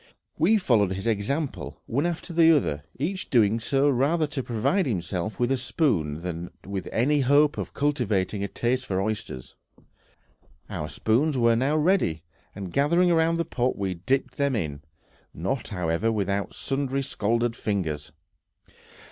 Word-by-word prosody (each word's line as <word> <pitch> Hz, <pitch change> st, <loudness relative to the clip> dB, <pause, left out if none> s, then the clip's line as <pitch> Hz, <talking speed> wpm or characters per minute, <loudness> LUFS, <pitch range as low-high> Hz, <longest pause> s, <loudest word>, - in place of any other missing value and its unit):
We 195 Hz, +8 st, +5 dB
followed 110 Hz, -, +2 dB
his 95 Hz, +1 st, -5 dB
example, 105 Hz, -, -2 dB
one 140 Hz, +8 st, 0 dB
after 170 Hz, 0 st, -4 dB
the 165 Hz, 0 st, +6 dB
other, 75 Hz, -, -1 dB, 0.2 s
each 185 Hz, +8 st, -3 dB
doing 115 Hz, -2 st, +3 dB
so 135 Hz, +5 st, +2 dB
rather 145 Hz, +5 st, +2 dB
to 145 Hz, -2 st, -3 dB
provide 125 Hz, -, 0 dB
himself 90 Hz, -1 st, -3 dB
with 120 Hz, +1 st, +1 dB
a 135 Hz, -, +2 dB
spoon 90 Hz, -, 0 dB
than 85 Hz, -1 st, -5 dB, 0.2 s
with 95 Hz, -1 st, -4 dB
any 145 Hz, +6 st, +2 dB
hope 145 Hz, +3 st, +4 dB
of -, -, -6 dB
cultivating 110 Hz, -9 st, 0 dB
a -, -, -1 dB
taste 125 Hz, +6 st, -1 dB
for 95 Hz, -1 st, 0 dB
oysters. 105 Hz, -, -4 dB, 1.2 s
Our 75 Hz, -, -4 dB
spoons 125 Hz, -, +1 dB
were 115 Hz, -1 st, +4 dB
now 135 Hz, +6 st, +1 dB
ready, 150 Hz, -, +2 dB, 0.3 s
and 95 Hz, -3 st, -7 dB
gathering 170 Hz, +5 st, +3 dB
round 165 Hz, 0 st, +3 dB
the 170 Hz, -, 0 dB
pot 125 Hz, 0 st, -1 dB
we 95 Hz, -2 st, -1 dB
dipped 130 Hz, +11 st, -1 dB
them 140 Hz, -2 st, +1 dB
in, 75 Hz, -9 st, -3 dB, 0.5 s
not, 95 Hz, -, -2 dB
however, 90 Hz, +3 st, 0 dB
without 100 Hz, -2 st, -1 dB
sundry 135 Hz, 0 st, -2 dB
scalded 115 Hz, -1 st, 0 dB
fingers. 80 Hz, -10 st, -2 dB
120 Hz, 150 wpm, -26 LUFS, 95-145 Hz, 1.2 s, the